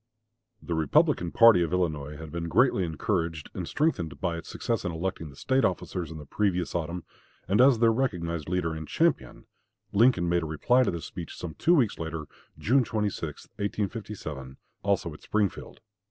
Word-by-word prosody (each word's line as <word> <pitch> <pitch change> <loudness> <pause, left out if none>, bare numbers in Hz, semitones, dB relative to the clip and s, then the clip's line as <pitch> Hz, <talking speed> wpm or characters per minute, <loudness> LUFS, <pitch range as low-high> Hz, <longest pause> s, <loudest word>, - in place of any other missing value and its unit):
The 85 - -3
Republican 80 +2 +2
party 115 -6 +7
of 85 -2 0
Illinois 75 -5 -1
had 80 -1 -9
been 85 0 -3
greatly 120 -2 +3
encouraged 80 -1 -2
and - - -5
strengthened 85 - -1
by 85 0 -1
its 85 - -8
success 115 -3 -2
in 90 - -2
electing 80 -1 -4
the 70 - -14
State 130 - +1
officers 90 -2 -1
in 80 - -7
the 75 - -9
previous 90 +1 -1
autumn; 85 +1 -3 0.4
and 100 +5 +4
as 130 -2 +6
their 115 0 +4
recognized 85 - -2
leader 90 -3 0
and 80 -1 -6
champion, - - 0 0.5
Lincoln 110 -4 +4
made 85 0 +2
a 80 - -4
reply 95 - +3
to 125 - +2
this 85 -2 -4
speech 85 - -8
some 85 -3 -6
two 175 - +3
weeks 125 -9 +2
later, 80 -1 -4 0.3
June 130 +4 +3
26, 105 -9 -3
1857, 100 - -4 0.3
also - - 0
at - - -13
Springfield. 105 -3 -2
85 Hz, 175 wpm, -27 LUFS, 80-105 Hz, 0.5 s, party